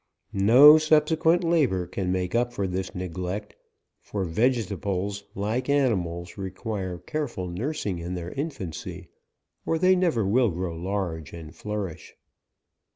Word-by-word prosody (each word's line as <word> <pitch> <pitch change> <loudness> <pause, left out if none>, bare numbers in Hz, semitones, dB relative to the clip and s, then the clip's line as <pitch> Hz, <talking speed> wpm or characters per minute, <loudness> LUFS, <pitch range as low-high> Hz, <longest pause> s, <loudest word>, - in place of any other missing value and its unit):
No 125 +10 +8
subse 155 0 +3
quent 165 +2 +3
labour 140 - +2
can 90 +1 -3
make 90 -1 -1
up 120 +1 +1
for 100 -4 -2
this 95 0 -3
neglect; 90 +3 -4 0.4
for 100 -2 -4
vegetables, 100 -1 -1
like 110 +7 -2
animals, 90 -11 0
require 95 -1 -4
careful 120 - -4
nursing 100 - -3
in 85 +2 -4
their 90 0 -5
infancy, 135 - -5 0.5
or 165 - 0
they 185 +3 +4
never 170 - +1
will 120 +4 +3
grow 90 -1 -3
large 85 -3 -3
and 80 -1 -9
flourish. 105 -5 -5
100 Hz, 130 wpm, -26 LUFS, 90-130 Hz, 0.5 s, No